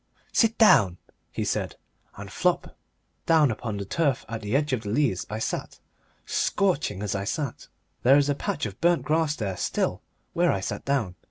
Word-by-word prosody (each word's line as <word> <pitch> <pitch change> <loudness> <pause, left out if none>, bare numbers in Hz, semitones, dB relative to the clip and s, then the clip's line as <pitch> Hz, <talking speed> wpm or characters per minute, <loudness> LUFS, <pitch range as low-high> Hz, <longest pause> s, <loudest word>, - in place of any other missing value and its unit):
"Sit 225 -1 +3
down," 100 - +5 0.3
he - - -3
said, - - -2 0.4
and - - -8
flop, - - 0 0.5
down 155 -5 +5
upon 110 -1 -4
the 100 - -4
turf 140 - 0
at 115 0 -5
the 105 +3 -2
edge 145 -1 +1
of 125 - 0
the 105 - -6
Leas 115 -5 0
I 105 - -3
sat 110 - -4 0.5
scorching 150 - 0
as 105 - -2
I 100 0 -2
sat. 140 +4 -4 0.3
There 135 +3 +6
is 145 -1 +3
a 145 - +2
patch 140 - -3
of 100 -3 -7
burnt 175 0 +3
grass 155 -1 +1
there 100 -8 -3
still - - -1 0.3
where 175 0 +3
I 95 - -1
sat 95 - -5
down. 130 -10 0
130 Hz, 185 wpm, -26 LUFS, 105-155 Hz, 0.5 s, There